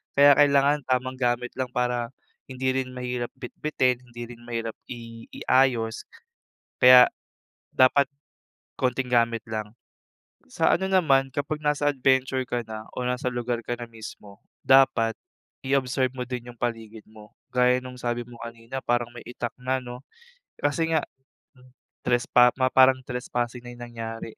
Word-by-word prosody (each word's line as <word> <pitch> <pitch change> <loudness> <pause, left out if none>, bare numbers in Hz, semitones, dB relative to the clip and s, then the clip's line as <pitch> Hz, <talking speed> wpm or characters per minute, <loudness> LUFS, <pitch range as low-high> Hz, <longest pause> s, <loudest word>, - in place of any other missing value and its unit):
Kaya 140 0 +8
kailangan 145 0 +4
tamang 130 0 -1
gamit 125 0 0
lang 130 -1 -1
para, 125 -1 -1 0.4
hindi 130 0 -1
rin 130 -1 -3
mahirap 125 -1 -3
bitbitin, 125 -1 -1
hindi 120 0 -8
rin 120 - -12
mahirap 115 -1 -3 0.2
i 115 -1 -9
iayos. 125 -4 +1 0.7
Kaya 125 0 +8 0.6
dapat 135 +2 +4 0.7
konting 130 0 -1
gamit 115 -2 +2
lang. 110 0 -4 0.8
Sa - - +2
ano 190 +1 0
naman, 135 -8 +3
kapag 145 +2 -3
nasa 150 -1 0
adventure 130 0 +1
ka 120 -2 -2
na, 110 0 -8
o 125 - -2
nasa 125 0 -1
lugar 120 -1 -3
ka 120 +1 -4
na 120 - -6
mismo, 110 -3 -12 0.2
dapat 130 -4 +5 0.5
i-observe 130 -1 +1
mo 125 - -3
din 125 -1 -6
'yung 120 - -12
paligid 115 -2 -5
mo. 110 -1 -15 0.2
Gaya 125 0 +4
nung 130 0 -7
sabi 120 0 -2
mo 120 -1 -13
kanina 115 +3 -7
parang 120 0 -1
may 120 - -9
itak 120 -1 -5
na 130 +1 0
'no, 125 0 -8 0.6
kasi 160 +3 0
nga 160 -2 +1 1.0
trespa 120 0 +4
ma 130 0 +2
parang 130 0 +6
trespassing 125 0 -3
na 120 - -8
'yung 120 - -13
nangyari. 115 -1 -7
125 Hz, 150 wpm, -25 LUFS, 120-130 Hz, 1.0 s, Kaya